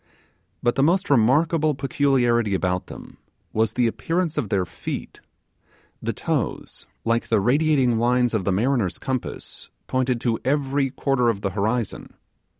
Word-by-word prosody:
But 120 -1 +3
the - - 0
most 175 +4 +2
remarkable 150 +5 +3
peculiarity 125 -6 +1
about 90 -1 -1
them - - -11 0.4
was 110 0 +1
the 125 - +2
appearance 165 +8 -1
of 105 - -2
their 95 -2 +1
feet; - - -7 0.8
the - - -1
toes, - - -3 0.2
like 115 +1 +1
the 110 - +2
radiating 130 0 +2
lines 120 0 +2
of 110 -4 0
the 100 - 0
mariner's 110 -1 +1
compass, 130 -2 -5 0.2
pointed 130 -1 0
to 115 -2 0
every 140 0 +1
quarter 125 -2 +1
of 100 -3 -2
the 100 - -1
horizon. 110 +4 -2
125 Hz, 145 wpm, -23 LUFS, 110-140 Hz, 0.8 s, But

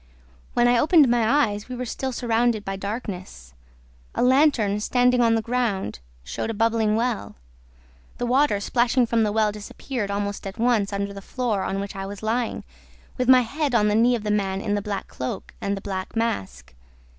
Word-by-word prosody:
"When 240 0 +4
I 245 -1 +4
opened 310 -1 +5
my 240 +5 +3
eyes, 205 +3 -7
we 250 - -4
were 250 +1 -4
still 260 +2 -3
surrounded 235 -2 0
by 195 - -3
darkness. 190 - -6 0.6
A - - +1
lantern, 250 -6 +3
standing 250 +3 +2
on 230 -1 +4
the 225 - 0
ground, 225 - -1 0.2
showed 65 - -4
a 225 - -3
bubbling 225 -1 +2
well. 230 - -2 0.8
The 245 - -2
water 255 -3 +2
splashing 240 +4 +2
from 230 0 +1
the 215 -1 +1
well 215 0 +2
disappeared, 210 +2 -5
almost 200 0 -3
at 195 - -8
once, 225 -4 +2
under 200 0 -3
the 200 - -8
floor 230 -2 -2
on 195 - -2
which 200 +1 -5
I 195 0 -5
was 200 +1 -8
lying, 230 +2 -1 0.6
with 250 0 +1
my 255 -1 +8
head 280 +2 -2
on 210 -2 +4
the - - +1
knee 240 +2 +4
of 225 - -5
the 210 - -1
man 195 -2 0
in 205 +1 -2
the 205 - 0
black 200 -1 -4
cloak 130 - -6
and 200 0 -1
the - - -7
black 190 +1 -5
mask. 225 - -3
220 Hz, 195 wpm, -24 LUFS, 200-245 Hz, 0.8 s, my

